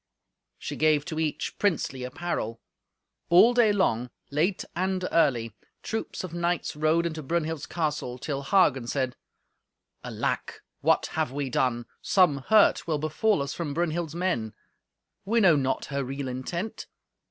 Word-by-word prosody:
She - - -5
gave 155 -2 +3
to 155 - -4
each 155 -2 -2
princely 155 -9 0
apparel. 125 -5 -3 0.7
All 200 +8 +7
day 235 -3 +5
long, 125 - +1 0.2
late 170 +7 0
and 185 0 -1
early, 120 -9 +2 0.3
troops 220 -3 -4
of 180 -3 -6
knights 175 -1 -1
rode 155 +3 +2
into 160 -2 -3
Brunhild's 160 0 -2
castle, 150 -6 -2
till 140 +3 -3
Hagen 135 -6 +3
said, 130 -1 -1 0.9
"Alack! - - -3 0.2
What - - +3
have - - 0
we 140 -1 -3
done? 120 -2 0 0.2
Some 180 -7 +4
hurt 215 -4 +5
will 155 -2 +1
befall 155 +4 +1
us 140 - -4
from 150 -5 -4
Brunhild's 170 -1 -1
men. 145 - -1 0.7
We 225 +4 +2
know 185 -7 +6
not 130 -2 0
her 140 -1 -2
real 135 +1 -4
intent. 170 - -4
155 Hz, 140 wpm, -27 LUFS, 135-175 Hz, 0.9 s, All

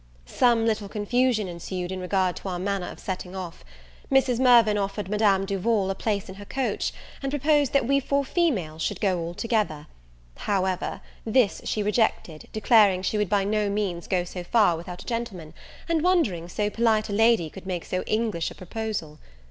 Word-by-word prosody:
Some 235 - +2
little 215 -3 -1
confusion 220 +1 +1
ensued 175 +1 -5
in 190 - -4
regard 185 -1 0
to 195 - -6
our 180 - -3
manner 195 0 -2
of - - -10
setting 185 -1 -5
off. 180 -3 -7 0.5
Mrs. 260 -3 +3
Mirvan 235 -4 +6
offered 200 -1 -2
Madame 205 -2 +2
Duval 195 0 0
a - - 0
place 200 0 -2
in 185 - -8
her - - -9
coach, 265 +4 -2 0.3
and 275 -1 -2
proposed 290 -1 +2
that 275 -3 +3
we 275 +3 +3
four 280 +1 0
females 200 - 0
should - - -2
go 190 -4 +1
all 170 +1 -5
together; 205 -8 -1 0.5
however, 190 -2 -1 0.2
this 225 -2 +2
she 210 - -1
rejected, 210 -7 0
declaring 210 -4 +4
she 210 +2 0
would 210 -3 0
by 200 -1 +2
no 210 0 0
means 200 -4 -2
go 180 -2 +1
so 180 0 -7
far 205 -2 +3
without 175 +2 -8
a - - -21
gentleman, 205 -10 -4 0.3
and 335 -2 +1
wondering 265 - +1
so 205 +3 -1
polite 220 -2 +2
a - - -3
lady 225 -5 +4
could 190 +4 -11
make 180 -3 -3
so 185 - -2
English 215 -7 0
a - - -12
proposal. 185 -5 -5
205 Hz, 185 wpm, -25 LUFS, 185-230 Hz, 0.5 s, Mirvan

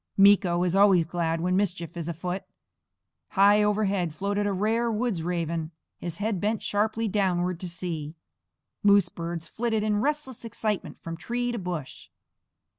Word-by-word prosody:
Meeko 195 -3 +5
is 180 0 0
always 195 -4 +5
glad 165 -1 -1
when 180 +1 +1
mischief 175 -4 -1
is 170 -1 -4
afoot. 180 +3 -3 0.9
High 205 +1 +6
overhead 200 -5 +1
floated 200 +3 -1
a - - +1
rare 225 +4 +1
woods' 220 -5 -1
raven, 165 -2 -2 0.3
his 170 -1 -5
head 205 -2 -1
bent 215 +1 0
sharply 220 +2 0
downward 180 -3 0
to 180 - -5
see. 165 -3 -4 0.7
Moose 200 -4 +5
birds 170 -1 -5
flitted 225 0 -1
in 210 -1 +1
restless 290 -3 -2
excitement 215 -3 -3
from 165 0 -5
tree 245 +7 -2
to 235 - -3
bush. 175 -7 -6
195 Hz, 150 wpm, -27 LUFS, 170-210 Hz, 0.9 s, High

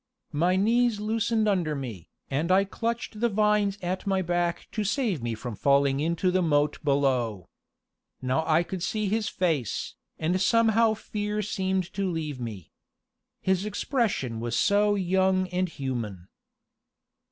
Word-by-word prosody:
My 175 +5 +2
knees 230 +3 +2
loosened 220 +1 0
under 175 -7 +1
me, 110 - -7 0.2
and 155 +6 0
I 190 +1 +5
clutched 230 +2 -3
the 235 +1 +2
vines 210 -1 +2
at 185 +2 -3
my 190 -1 +1
back 175 0 -1
to 215 - -2
save 210 - 0
me 115 -1 -2
from 115 0 -6
falling 140 +3 +3
into 170 +4 +1
the 185 0 +2
moat 150 -3 +2
below. 130 - 0 0.7
Now 130 +5 0
I 160 +2 +4
could 185 +1 -6
see 215 +2 -1
his 220 +1 0
face, 155 - -1 0.2
and 175 +4 0
somehow 225 +1 +4
fear 210 0 -3
seemed 190 -2 -1
to 195 -1 -1
leave 155 -5 -3
me. 110 -8 -7 0.7
His 190 0 +1
expression 205 - -1
was 120 0 -2
so 205 - +3
young 190 0 +2
and 180 0 -1
human. 115 - -5
185 Hz, 145 wpm, -27 LUFS, 140-210 Hz, 0.7 s, I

